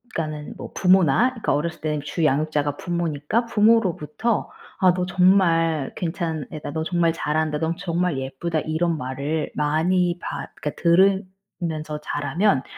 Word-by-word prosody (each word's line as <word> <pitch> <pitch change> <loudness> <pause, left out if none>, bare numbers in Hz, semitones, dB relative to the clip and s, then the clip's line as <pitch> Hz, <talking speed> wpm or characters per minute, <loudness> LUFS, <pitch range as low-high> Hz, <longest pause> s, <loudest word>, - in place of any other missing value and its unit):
그러니까는 155 -2 -4
뭐 - - -8
부모나 185 - +4
그러니까 230 -4 -1
어렸을 170 +3 -2
때는 150 -1 -1
주 150 +3 -3
양육자가 145 0 +1
부모니까 170 +5 -1
부모로부터 215 -3 +1 0.3
"아 185 -3 +5
너 180 0 -1
정말 170 -5 +3
괜찮은 165 -3 -3
애다.", 150 -1 -6
"너 160 +1 -2
정말 170 -1 +1
잘한다.", 155 -1 -1
"넌 165 +1 -1
정말 175 -3 -1
예쁘다." 135 +5 -2
이런 160 +2 0
말을 140 +4 -3
많이 175 +4 +1
받 - - -5
그니까 150 - -6
들으면서 185 -4 +1
자라면 145 +2 0
165 Hz, 330 characters per minute, -23 LUFS, 150-180 Hz, 0.3 s, 아